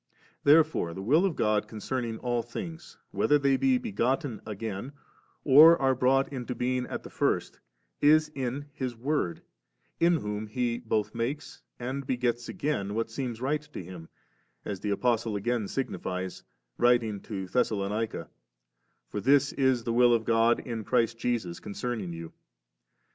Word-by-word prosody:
Therefore 150 - +4
the 95 - -5
Will 155 - +4
of 185 -6 0
God 105 -1 +1
concerning 115 +2 -3
all 120 0 -1
things, 160 +8 -8
whether 150 - +3
they 140 -1 +2
be 260 - +3
begotten 140 - -1
again 110 +4 -5 0.5
or 155 +4 +8
are 135 -1 +3
brought 135 +2 +2
into 125 -1 -4
being 125 0 -1
at - - -5
the - - -10
first, - - -1 0.4
is 155 +1 +5
in 135 +1 -3
His 130 -5 -4
Word, 120 - -2 0.6
in 170 +1 +4
whom 105 -6 -3
He 120 +1 -1
both 110 -3 -1
makes 120 +5 -4 0.2
and 130 +2 -4
begets 120 -2 -1
again 105 -9 -2
what 115 0 -2
seems 120 -2 -4
right 145 +3 0
to 150 -10 -9
Him; 85 -2 -10 0.6
as 100 -3 -4
the 105 - -3
Apostle 115 +1 +1
5 - - -1
again 115 0 -1
signifies, 95 -8 -4 0.4
writing 120 -4 +3
to 95 -2 -5
Thessalonica; 105 0 -1 0.8
*for 105 - -4
this 140 +4 +4
is 130 -3 +2
the 115 - -1
will 120 0 +5
of 115 -1 -2
God 115 0 +3
in 115 -3 -5
Christ 115 0 +1
Jesus 115 -9 -2
concerning 105 -3 -4
you. 85 -1 -8
120 Hz, 155 wpm, -28 LUFS, 110-135 Hz, 0.8 s, or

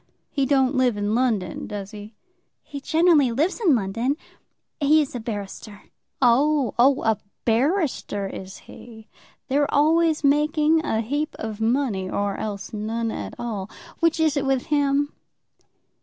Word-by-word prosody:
He 275 -2 0
don't 265 -1 +3
live 255 -5 +2
in 205 +1 -1
London; 220 -8 -1
does 200 -1 -6
he?" 210 0 -10 0.5
"He 285 -2 -8
generally 315 -4 +3
lives 310 - 0
in 340 - +4
London. 230 +7 -1 0.6
He 305 +1 +4
is 295 -3 -1
a 245 - -4
barrister." 205 -1 -7 0.4
"Oh, 270 +2 +3
oh; 270 +3 +4
a 220 -2 +1 0.3
barrister 255 - 0
is 190 0 -7
he. 220 -2 -13 0.4
They're 285 +1 +1
always 315 +1 +3
making 300 +2 +3
a 220 -6 0
heap 290 +7 -2
of 220 -1 -6
money, 225 -5 0
or 200 0 -1
else 205 -1 -5
none 225 +2 -2
at - - -6
all. 210 -5 -4 0.3
Which 330 -1 +2
is 315 -2 +2
it 280 - 0
with 270 -2 +1
him?" 285 0 +1
255 Hz, 145 wpm, -23 LUFS, 215-290 Hz, 0.6 s, in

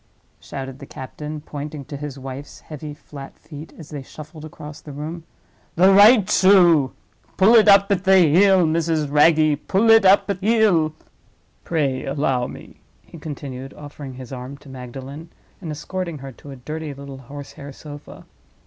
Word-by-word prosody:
shouted 135 0 -8
the 140 - -11
captain, 150 +3 -8
pointing 145 -1 -7
to 145 - -8
his 140 -1 -7
wife's 135 +1 -9
heavy 150 -1 -8
flat 145 -1 -11
feet 150 0 -11
as 160 -2 -12
they 145 -2 -6
shuffled 155 +3 -12
across 150 -1 -10
the 150 - -10
room. 155 +4 -7 0.5
"The 185 +3 +5
right 205 +1 +7
shoe. 175 -8 +5 0.4
Pull 195 +5 +5
it 220 -2 +6
up 200 0 +6
at 190 -2 +1
heel, 190 +1 +5
Mrs. 160 -2 0
Wragge—pull 155 +7 +3
it 225 -2 +7
up 195 +1 +5
at 195 - -4
heel! 195 -7 +2 0.7
Pray 140 -6 -1
allow 135 -3 -1
me," - - -12 0.3
he 165 - -14
continued, 135 -3 -8
offering 145 -2 -10
his 130 0 -10
arm 130 +2 -8
to 140 - -16
Magdalen, 135 +5 -9 0.3
and 170 - -7
escorting 170 +2 -5
her 135 -1 -9
to 140 - -15
a 135 - -8
dirty 150 +3 -7
little 140 -1 -10
horse 140 +2 -10
hair 140 0 -10
sofa. 145 +1 -12
150 Hz, 160 wpm, -21 LUFS, 140-170 Hz, 0.7 s, right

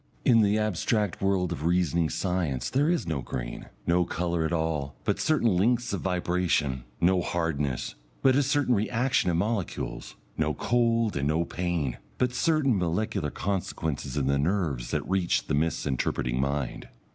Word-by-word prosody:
In 115 -2 +6
the 105 0 +3
abstract 105 -1 0
world 95 -2 +1
of 70 - -4
reasoning 85 -1 +2
science 90 -9 -1
there 145 +4 +2
is 175 -2 +1
no 80 -5 -2
green, - - -5 0.2
no 90 +1 +3
colour 85 -1 -1
at 80 - -1
all, 80 -4 -1
but - - 0
certain 120 -10 +2
lengths 120 +5 +2
of 100 - -2
vibration; 90 -8 0
no 90 +1 +3
hardness, 75 -8 -2 0.3
but 130 -1 +5
a 140 - +4
certain 140 -2 +2
reaction 120 +1 +1
of 85 - +1
molecules; 105 0 -3 0.2
no - - +1
cold 115 -2 +1
and 70 0 0
no 80 +3 +1
pain, 85 -10 -2 0.2
but 125 -1 +1
certain 140 - +2
molecular 85 -3 -1
consequences 80 -7 -3
in 70 - +1
the 70 +1 +2
nerves 75 -7 0
that - - -2
reach 95 -2 +1
the - - -2
misinterpreting 65 -5 0
mind. 70 -2 -2
90 Hz, 155 wpm, -27 LUFS, 75-110 Hz, 0.3 s, In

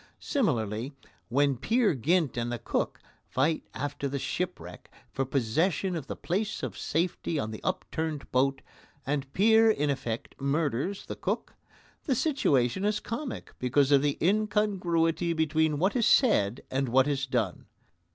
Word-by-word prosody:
Similarly, 125 - -1 0.3
when 140 +2 +2
Peer 225 - +2
Gynt 155 +2 +1
and 120 0 -2
the 120 - -2
Cook - - -2 0.3
fight 150 +5 0
after 145 0 -3
the 140 +1 -3
shipwreck 180 +6 -4 0.2
for 135 - -1
possession 155 - 0
of 150 -5 -5
the - - -4
place 200 +5 -2
of - - -3
safety 165 0 -1
on 110 -6 -2
the 110 - -7
upturned 160 -5 -3
boat, 135 +1 +1 0.4
and 140 -1 -2
Peer 220 +3 +5
in 150 -9 +2
effect 120 -4 -4
murders 145 +5 -1
the - - -6
Cook, - - -3 0.5
the 270 - +1
situation 190 - +1
is 210 0 +1
comic 240 +5 -5
because 130 +3 +2
of 140 -1 +6
the 145 -1 0
incongruity 180 -4 +1
between 160 -1 +1
what 190 - +1
is 235 -3 +3
said 125 - +3
and 135 -1 0
what 130 +3 +4
is 140 -1 -1
done. 115 -8 -2
150 Hz, 150 wpm, -28 LUFS, 135-190 Hz, 0.5 s, of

